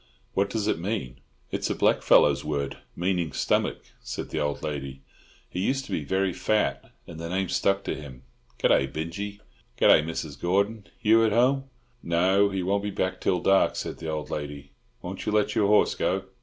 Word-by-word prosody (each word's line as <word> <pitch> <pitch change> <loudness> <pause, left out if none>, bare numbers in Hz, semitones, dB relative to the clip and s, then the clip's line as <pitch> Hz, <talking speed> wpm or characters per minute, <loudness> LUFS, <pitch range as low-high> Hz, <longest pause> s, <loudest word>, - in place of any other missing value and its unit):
"What 100 +1 +1
does 110 -2 -2
it 95 - +1
mean?" 85 - -3 0.3
"It's - - -2
a - - 0
blackfellow's 70 -1 +4
word, 70 -2 -2 0.2
meaning 90 -2 -1
stomach," - - 0 0.2
said - - -6
the - - -1
old 75 -1 -2
lady. 70 -3 -5 0.4
"He 90 - -6
used 135 +7 0
to - - -11
be 75 - -1
very 95 +4 0
fat, 105 -11 0
and 80 -1 -10
the 85 0 -5
name 95 0 -1
stuck 100 +1 +1
to - - -2
him. 65 -4 -9 0.4
Good - - +3
day, 65 - +4
Binjie!" 100 +8 -5 0.4
"Good - - +4
day, - - +8
Mrs. 80 -3 -5
Gordon. 100 +4 0
Hugh 115 +1 +4
at 110 -2 +2
home?" 135 +4 +3 0.4
"No, 95 +4 +3
he 95 -2 -2
won't 100 +2 +1
be 105 - -3
back 95 -2 -2
till 90 -2 +1
dark," 95 +1 +3
said - - -5
the 80 - -5
old 75 -1 -4
lady. 70 -2 -5 0.3
"Won't - - -6
you - - +1
let 105 0 +2
your 105 - +2
horse 105 +1 +4
go?" 95 +1 0
95 Hz, 195 wpm, -26 LUFS, 75-100 Hz, 0.4 s, day